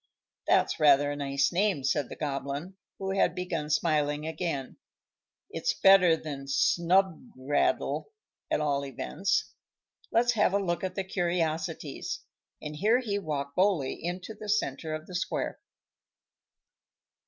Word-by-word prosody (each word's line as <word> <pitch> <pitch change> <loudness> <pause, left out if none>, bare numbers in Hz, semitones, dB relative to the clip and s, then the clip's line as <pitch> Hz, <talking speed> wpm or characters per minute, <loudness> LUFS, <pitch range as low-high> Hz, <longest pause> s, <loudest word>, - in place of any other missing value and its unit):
"That's - - +3
rather 145 -1 +5
a - - -3
nice 140 -1 0
name," 185 -5 +1
said 140 -1 0
the - - -7
Goblin, 145 +4 -4 0.2
who 190 0 -3
had 195 - +2
begun 170 -4 -3
smiling 150 -1 +1
again. 160 -5 -3 0.7
"It's 450 - -1
better 185 -4 +7
than 140 -3 -7
Snubgraddle, 165 - +1 0.4
at - - +1
all 140 -2 0
events. 115 - -1 0.6
Let's 240 +1 +4
have 210 -4 +2
a - - +5
look 175 -3 -2
at 185 -1 -3
the 195 - -1
curiosities;" 170 -4 -2 0.4
and 150 0 -6
here 215 +8 +4
he 210 -6 -2
walked 140 -5 -4
boldly 180 -9 +1
into 180 +5 -4
the 215 0 -9
centre 155 -6 -1
of 155 0 -7
the 185 - -11
square. 180 - -2
160 Hz, 130 wpm, -29 LUFS, 145-190 Hz, 0.7 s, better